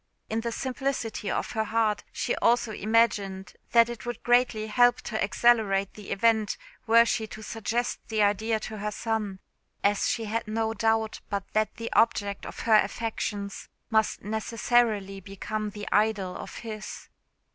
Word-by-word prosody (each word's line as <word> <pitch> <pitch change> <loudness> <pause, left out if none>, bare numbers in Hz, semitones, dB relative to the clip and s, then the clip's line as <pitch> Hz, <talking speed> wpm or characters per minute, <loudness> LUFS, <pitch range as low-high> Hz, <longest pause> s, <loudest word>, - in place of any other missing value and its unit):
In 225 +1 0
the 235 0 -2
simplicity 255 -5 -3
of - - -2
her 220 0 -1
heart 220 -2 +1
she - - -1
also 235 -1 +2
imagined 205 -4 +1 0.2
that 230 -1 +6
it 240 -1 -7
would 240 0 -5
greatly 240 -3 +3
help 245 +3 +4
to 220 -1 -2
accelerate 200 -3 +3
the 210 -2 -11
event 220 0 +2 0.3
were 230 +1 +7
she 225 -1 -1
to 215 0 -9
suggest 230 +3 -2
the 215 -2 +1
idea 215 +2 +1
to 215 -1 -6
her 210 +1 -2
son, 215 -3 -2 0.5
as 200 0 +2
she 230 - -1
had 220 +1 -2
no 220 +1 -1
doubt 225 -1 0
but 200 -2 -2
that 215 0 +1
the 230 0 -5
object 205 -3 +2
of - - -7
her 220 -2 +5
affections 205 -1 -2 0.2
must 220 -1 +1
necessarily 220 -1 +1
become 210 +3 -4
the 205 0 -8
idol 210 -3 +1
of - - -8
his. 215 -2 -7
220 Hz, 155 wpm, -27 LUFS, 205-230 Hz, 0.5 s, were